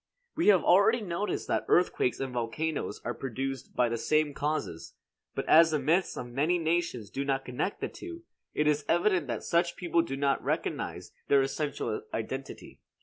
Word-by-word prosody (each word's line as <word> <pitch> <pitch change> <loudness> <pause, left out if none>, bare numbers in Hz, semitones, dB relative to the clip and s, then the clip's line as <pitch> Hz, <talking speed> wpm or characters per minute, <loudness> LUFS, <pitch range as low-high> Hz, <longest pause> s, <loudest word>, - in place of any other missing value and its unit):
We 330 - +1
have 195 -4 +6
already 200 +6 +5
noticed 200 +1 -3
that - - 0
earthquakes 175 -8 +2
and 135 -2 -3
volcanoes 125 +7 -2
are 120 - -1
produced 135 +2 -5
by 125 - +3
the 115 0 -2
same 155 +2 +1
causes; 145 - -3 0.4
but - - -2
as 165 +1 +7
the 155 - +1
myths 165 +7 +1
of - - -4
many 145 +9 +1
nations 160 - -1
do 135 - -2
not 135 -1 -1
connect 125 +10 -3
the - - -1
two, 340 -1 -9 0.3
it 150 - +2
is 150 -1 +2
evident 175 -2 +2
that 120 - -3
such 170 0 +1
people 170 -1 +1
did 135 -5 -4
not 140 -2 +1
recognize - - -3 0.2
their 140 -1 +5
essential 135 -5 -2
identity. 130 +4 -6
150 Hz, 175 wpm, -29 LUFS, 135-170 Hz, 0.4 s, as